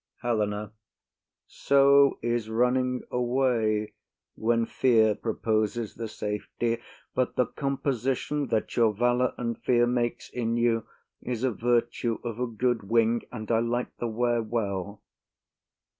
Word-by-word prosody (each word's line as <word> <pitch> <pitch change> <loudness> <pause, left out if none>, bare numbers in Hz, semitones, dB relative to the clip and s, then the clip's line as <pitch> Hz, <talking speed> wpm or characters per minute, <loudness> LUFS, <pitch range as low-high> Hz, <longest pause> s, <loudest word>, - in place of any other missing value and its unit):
HELENA. 105 -3 -1 0.7
So 140 0 +4
is 120 -2 -1
running 125 +2 +1
away, 120 -4 +1 0.4
when 115 +1 +1
fear 115 -3 +3
proposes 110 0 -1
the 115 0 -5
safety: 110 +2 -3 0.3
but 130 -1 0
the 125 - +3
composition 135 +1 -2
that 110 - -1
your 115 -3 +3
valour 120 +3 +1
and 115 -1 -3
fear 120 -1 +3
makes 120 -1 -1
in 115 -1 -1
you 115 -1 +1 0.3
is 125 -1 -4
a 130 - +2
virtue 120 0 0
of 120 -1 -5
a 125 - 0
good 120 +1 0
wing, 115 0 +3
and 110 -2 -5
I 115 - +4
like 120 +1 -2
the 120 - -2
wear 120 +1 +1
well. 100 -3 -3
120 Hz, 130 wpm, -27 LUFS, 110-125 Hz, 0.7 s, So